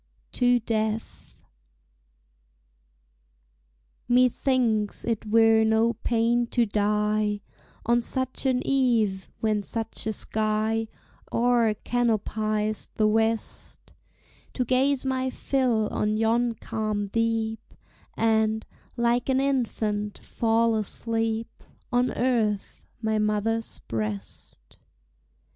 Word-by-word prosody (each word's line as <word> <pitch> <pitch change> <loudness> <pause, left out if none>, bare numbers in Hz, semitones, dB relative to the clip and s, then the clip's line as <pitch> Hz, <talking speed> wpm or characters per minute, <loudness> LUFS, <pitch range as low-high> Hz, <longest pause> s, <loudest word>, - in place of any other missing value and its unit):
TO 245 0 +3
DEATH. 220 -1 -3 2.6
Methinks 245 -3 +2
it 225 -2 -2
were 225 0 +5
no 220 +1 +3
pain 235 +1 +1
to 240 0 +2
die 210 0 0 0.4
On 240 +1 +3
such 260 +2 -1
an 255 -1 +1
eve, 230 -8 +1
when 215 -2 +1
such 225 +1 -4
a 220 - 0
sky 220 +1 -1 0.4
O'er 235 -2 +2
canopies 215 -2 -1
the 215 - +3
west; 225 +1 -2 0.6
To 250 - 0
gaze 265 +2 +2
my 260 0 0
fill 250 -5 0
on 215 0 0
yon 230 +2 +2
calm 215 -2 -3
deep, 225 +1 -2 0.4
And, 220 -1 +2 0.3
like 235 +2 +1
an 265 0 +3
infant, 220 -6 -1
fall 230 0 +1
asleep 225 +1 -2 0.3
On 245 +1 +2
Earth, 225 -5 -1 0.2
my 220 0 +1
mother's 215 +2 -1
breast. 105 - -6
225 Hz, 95 wpm, -26 LUFS, 215-240 Hz, 2.6 s, were